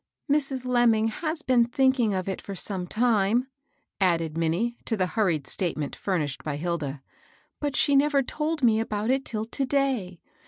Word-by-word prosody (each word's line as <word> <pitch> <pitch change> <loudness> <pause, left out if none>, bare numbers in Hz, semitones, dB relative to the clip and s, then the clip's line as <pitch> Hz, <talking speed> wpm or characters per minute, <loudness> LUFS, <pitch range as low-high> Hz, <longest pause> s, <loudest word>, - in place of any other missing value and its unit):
"Mrs. 275 -3 0
Lemming 235 -3 +3
has 310 +7 -4
been 250 -2 +4
thinking 250 -1 +2
of 185 -1 -2
it 190 - -3
for 200 - -7
some 185 -1 0
time," 225 +2 +2 0.5
added 165 -5 +1
Minnie 170 +9 0
to 225 - 0
the 185 - +2
hurried 180 -7 0
state 175 +4 -2
ment 150 -2 -4
furnished 155 -8 -2
by 150 -2 -3
Hilda; 150 -4 -3 0.3
" - - -35
but 290 -2 -1
she 285 - +3
never 280 0 +3
told 305 +2 -3
me 225 -2 +4
about 215 +1 -1
it 270 +1 +1
till 220 -3 -3
to 250 +4 -3
day. 255 -11 0
220 Hz, 180 wpm, -26 LUFS, 180-260 Hz, 0.5 s, been